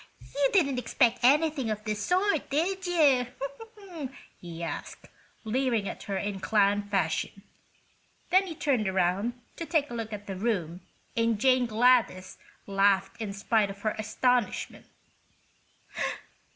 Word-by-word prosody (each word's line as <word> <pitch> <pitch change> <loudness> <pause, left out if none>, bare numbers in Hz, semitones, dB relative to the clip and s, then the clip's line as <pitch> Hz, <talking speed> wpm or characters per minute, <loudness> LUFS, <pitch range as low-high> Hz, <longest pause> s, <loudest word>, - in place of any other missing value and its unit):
"You 280 -1 +2
didn't 280 -9 +2
expect 245 -1 +2
anything 290 -1 +3
of 215 0 -3
this 210 -1 -3
sort, 365 - +1
did 365 +6 -1
you?" 285 -8 +4 1.1
he 170 -1 -8
asked, 165 - -6 0.4
leering 230 -2 0
at - - -6
her 195 - -1
in 200 0 -3
clown 205 0 +2
fashion. 195 +1 -1 0.9
Then 380 +1 +4
he 330 - -6
turned 255 -9 0
around 190 +6 0 0.2
to 335 - -4
take 300 -6 +1
a - - -5
look 225 -2 -4
at 205 -1 -7
the 195 - -5
room 185 -5 -2 0.3
and 230 -2 +1
Jane 255 0 +3
Gladys 225 -5 +2 0.3
laughed 195 +1 +1
in 210 -2 -3
spite 205 +1 +1
of 200 0 -9
her 215 - +1
astonishment. 245 +2 0
225 Hz, 135 wpm, -28 LUFS, 200-270 Hz, 1.1 s, you